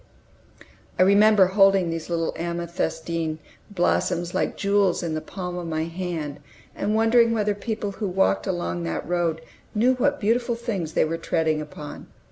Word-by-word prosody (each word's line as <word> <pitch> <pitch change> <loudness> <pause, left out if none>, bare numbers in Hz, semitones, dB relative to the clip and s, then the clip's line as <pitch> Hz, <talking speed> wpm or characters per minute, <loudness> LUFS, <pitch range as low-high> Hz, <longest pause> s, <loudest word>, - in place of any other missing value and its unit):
I 185 - +6
remember 200 +1 +6
holding 195 -2 +4
these 165 0 -5
little 165 -1 -1
amethystine 170 -1 -3 0.3
blossoms 175 -2 0
like - - -1
jewels 200 -3 +2
in 165 -2 -2
the 155 - -2
palm 180 -1 -5
of 175 - -6
my 160 -1 -1
hand, 165 -4 -4 0.4
and 210 +2 -1
wondering 230 +1 +4
whether 210 -2 +1
people 210 0 -4
who 205 +1 -4
walked 100 - +1
along 85 0 -2
that 80 - -3
road 170 -2 0 0.3
knew 240 +5 +4
what 285 +3 +1
beautiful 235 +3 +1
things 205 -9 -4
they - - +3
were 165 +1 -2
treading 160 -2 0
upon. 150 0 -9
180 Hz, 155 wpm, -24 LUFS, 165-205 Hz, 0.4 s, I